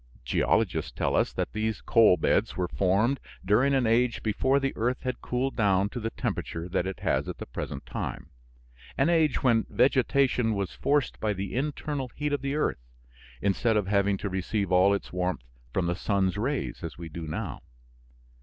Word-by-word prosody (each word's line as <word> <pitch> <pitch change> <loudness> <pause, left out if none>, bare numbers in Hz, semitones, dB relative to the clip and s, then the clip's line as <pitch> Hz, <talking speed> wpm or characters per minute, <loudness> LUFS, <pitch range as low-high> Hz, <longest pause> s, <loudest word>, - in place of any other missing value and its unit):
Geologists - - +1
tell - - -1
us - - +2
that - - -3
these 110 -1 -1
coal 110 -6 +5
beds - - +1
were 90 -1 0
formed 100 +10 +1 0.3
during 125 +8 +3
an 130 -2 +2
age 115 +2 +2
before 130 +6 +2
the 135 0 -1
earth 125 +3 -1
had 130 -1 -3
cooled 130 +2 -1
down 100 -3 +2
to 125 - -5
the 115 0 -2
temperature 85 -5 -4
that 90 0 -1
it 95 - -6
has - - 0
at - - -5
the - - -6
present - - -6
time - - -5 0.7
an 140 +4 +3
age 160 -4 +2
when 115 -4 +3
vegetation 130 -3 +2
was 100 -2 -3
forced 145 -2 0
by 110 -1 0
the 95 0 -5
internal 145 0 -2
heat 150 0 -2
of 145 - 0
the 140 +1 -2
earth 150 - 0 0.6
instead 105 +3 +2
of 105 - +1
having 100 0 +2
to 100 - -4
receive 95 +1 -2
all 90 +2 +5
its 100 - -6
warmth 90 -8 -1 0.3
from 90 - 0
the 85 - +1
sun's 95 0 0
rays 125 0 -2
as 85 - -6
we 85 -1 -7
do 80 +1 -7
now. 75 - -4
110 Hz, 185 wpm, -27 LUFS, 95-130 Hz, 0.7 s, coal